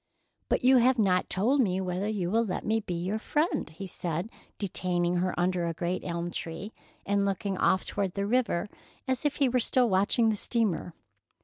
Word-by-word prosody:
"But - - +1
you 260 +1 +6
have 250 +1 +4
not 185 -4 +2
told 245 +9 +2
me 190 -5 +1
whether 185 +1 -2
you 195 -5 -1
will 230 +2 +3
let 200 -5 -3
me 220 +1 +2
be 180 -5 -4
your 185 +6 -2
friend," 305 +8 0
he 170 +5 -8
said, 175 +2 -4 0.3
detaining 180 -2 -1
her 180 0 -1
under 175 -1 +1
a 165 - -3
great 175 +2 -2
elm 170 0 -3
tree, 170 +7 -6 0.3
and 200 0 +1
looking 195 0 -1
off 185 - +2
toward 195 -3 -2
the 200 0 -1
river, 215 -4 +1 0.4
as 260 +2 -1
if 295 - +1
he 280 - +3
were 250 0 +2
still 245 +1 +3
watching 205 +3 +3
the 215 - +1
steamer. 205 -6 -1
195 Hz, 195 wpm, -28 LUFS, 180-230 Hz, 0.4 s, you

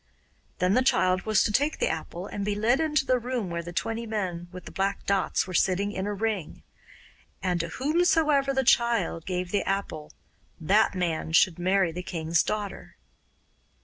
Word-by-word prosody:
Then 180 +1 +2
the 255 - +4
child 185 -7 +2
was 215 -2 +4
to - - 0
take 290 +8 +1
the - - +1
apple 170 +3 -4
and 200 - -5
be 205 0 -1
led 230 +5 +2
into 300 -5 +1
a 250 - +2
room 240 -6 -3
where 170 0 -2
the 170 +1 -8
twenty 225 +7 -3
men 185 -5 -3
with 180 0 -10
the - - -9
black 195 +1 -2
dots 195 -1 +1
were 185 - -8
sitting 195 +3 +1
in 190 -1 -3
a 210 - -2
ring. 210 -5 -3 0.8
And 180 -2 0
to 170 - -2
whomsoever 300 - +2
the 265 0 +1
child 230 -9 +2
gave 180 -1 -3
the 205 - +1
apple, 195 -6 -3 0.5
that 195 +6 +3
man 165 -3 -2
should 175 +1 +4
marry 185 0 +2
the 180 +2 -5
king's 165 -2 0
daughter. 210 -2 -4
195 Hz, 180 wpm, -27 LUFS, 175-230 Hz, 0.8 s, the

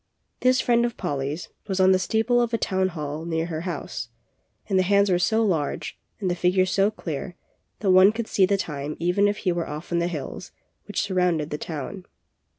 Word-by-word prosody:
This 255 0 +3
friend 235 -1 +3
of 240 -1 -2
Polly's 145 +3 -3 0.2
was 190 -2 -2
on 190 0 +6
the 185 - +4
steeple 225 +6 +2
of 235 -1 0
a - - +1
town 190 -3 +1
hall 155 -3 -5
near 165 -1 -1
her 160 -2 -4
house, 120 -7 -5 0.6
and 195 -3 +2
the - - +5
hands 200 +1 +3
were 175 - +3
so 220 +5 +2
large 160 -8 -2 0.2
and 195 - -2
the 180 - +1
figures 185 +1 +2
so 195 +1 +3
clear 175 -4 -6 0.5
that 195 -3 +3
one 185 +2 +7
could 230 +1 -3
see 190 -3 +3
the 200 +1 +2
time 150 -4 -4
even 180 +4 +2
if 205 0 0
he 180 - +3
were 170 -1 -2
off 150 +4 -7
on 170 - +2
the 170 - +1
hills 170 +1 -6 0.3
which 205 - -2
surrounded 180 -6 0
the 150 - -3
town. 165 +5 -6
185 Hz, 210 wpm, -25 LUFS, 160-200 Hz, 0.6 s, one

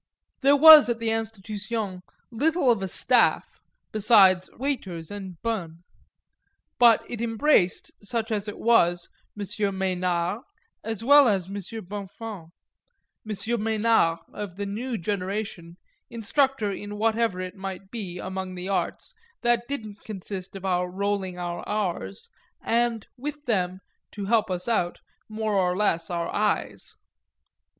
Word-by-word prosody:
There 280 +1 +5
was 310 -2 +10
at 235 - 0
the 230 -1 -1
Institution 215 -2 -4 0.3
little 285 +3 +2
of 225 -4 0
a 190 - -2
staff - - +2 0.3
besides 195 -4 +5
waiters 200 - -4
and 190 -4 -7
bonnes; 175 -8 -3 1.0
but 235 -2 +6
it 235 -2 -5
embraced, 225 -4 +2
such 225 +1 -3
as 210 -1 -1
it 210 - -6
was, 175 -7 +3 0.3
M. 205 - -3 0.3
Mesnard 180 +1 -1 0.4
as 225 -1 -3
well 285 +2 +7
as 190 -4 0
M. - - -7 0.3
Bonnefons 200 -2 -7 0.8
M. 215 +3 -2
Mesnard 220 -6 +2 0.2
of 205 -4 -6
the 200 +1 -4
new 230 +5 -3
generation, 190 -2 -4 0.3
instructor 235 0 0
in 205 +1 -6
whatever 225 -2 +1
it 185 0 -5
might 195 0 -7
be, 195 -7 -5
among 190 0 -5
the 180 +1 -5
arts, 195 - -2 0.3
that 240 0 +2
didn't 220 -7 -6
consist 195 -2 -7
of 195 0 -7
our 180 -1 0
rolling 195 -1 -2
our 175 -1 -4
r's, 175 - -3 0.4
and 235 -1 0
with 295 +3 -6
them, 185 -5 -1 0.3
to 205 -1 -5
help 220 0 +2
us 180 +1 -2
out, 180 -7 0 0.3
more 215 0 -2
or 180 -2 +1
less 170 -5 +1
our 170 -1 -3
eyes. 210 0 -1
205 Hz, 135 wpm, -25 LUFS, 185-230 Hz, 1.0 s, was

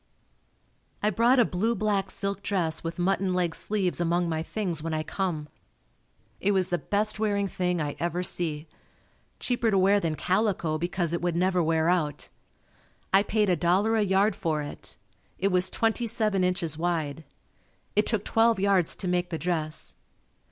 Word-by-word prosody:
I 210 - +3
brought 235 +6 +4
a 240 - +5
blue 220 +6 0
black 205 -3 0
silk 200 +1 -3
dress 180 -6 -1
with 165 0 -4
mutton 185 +1 +1
leg 175 -2 0
sleeves 190 -3 0
among 175 +1 +1
my 160 -1 -1
things 175 -2 -3
when 160 0 -3
I 155 - -1
come. 165 -5 -3 0.9
It 200 +1 +1
was 190 -2 +1
the 175 - 0
best 210 +1 -1
wearing 205 -2 +1
thing 180 -2 -1
I 145 -2 -2
ever 175 +1 -1
see. 160 -4 -1 0.7
Cheaper 240 -2 0
to 200 - +2
wear 195 +2 +4
than 165 -5 -1
calico 180 -4 0
because 175 0 -1
it 170 - -1
would 175 -1 -1
never 180 +1 +2
wear 160 0 +1
out. 165 -5 0 0.8
I 195 - +7
paid 210 0 +1
$1.00 185 +6 +2
a - - +3
yard 200 +2 +2
for 155 -4 -1
it. 145 - -7 0.4
It 195 - +1
was 180 -1 +3
twenty 225 +1 0
seven 215 -4 0
inches 175 -4 -1
wide. 160 -3 -2 0.7
It 210 +1 +3
took 215 -3 -1
twelve 225 -1 +3
yards 195 -4 +3
to 190 - -4
make 180 0 0
the 165 - -3
dress. 160 -3 -3
180 Hz, 170 wpm, -27 LUFS, 170-205 Hz, 0.9 s, I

